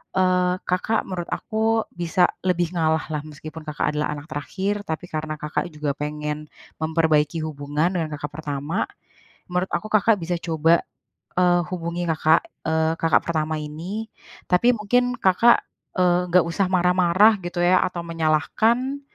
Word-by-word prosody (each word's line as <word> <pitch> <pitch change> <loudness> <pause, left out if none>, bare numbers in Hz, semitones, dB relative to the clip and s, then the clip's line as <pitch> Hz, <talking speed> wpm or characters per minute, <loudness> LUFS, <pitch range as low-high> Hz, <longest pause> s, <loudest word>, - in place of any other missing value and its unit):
eee, 180 -1 +3
Kakak 185 +5 0
menurut 175 -2 -4
aku 225 0 0
bisa 175 +1 +2 0.2
lebih 175 -2 +1
ngalah 160 -1 +1
lah, 150 -1 -2
meskipun 155 +1 -9
Kakak 150 0 -1
adalah 150 0 0
anak 145 +1 -9
terakhir, 195 +7 -3
tapi 160 +2 -4
karena 155 0 -3
Kakak 150 +3 -3
juga 150 -2 -2
pengen 150 0 -4 0.3
memperbaiki 160 -1 +2
hubungan 150 +3 -1
dengan 160 -3 -1
kakak 145 0 -5
pertama, 145 +5 -2 0.7
menurut 180 +1 0
aku 215 - -1
Kakak 215 +1 +4
bisa 175 +2 -1
coba, 165 0 +3 0.6
eee, 175 -1 +4
hubungi 170 -1 -3
kakak, 160 0 +3 0.2
eee, 160 0 +2
kakak 165 - +3
pertama 155 -1 -1
ini, 175 +9 -6 0.4
tapi 210 +7 +4
mungkin 245 +4 +1
Kakak, 210 +6 +5 0.4
eee, 180 0 +3
nggak 180 +1 +6
usah 185 +3 0
marah-marah, 185 +3 +4
gitu 175 0 -3
ya, 180 +1 +5
atau 180 -1 -4
menyalahkan, 215 - +1
170 Hz, 145 wpm, -23 LUFS, 155-185 Hz, 0.7 s, nggak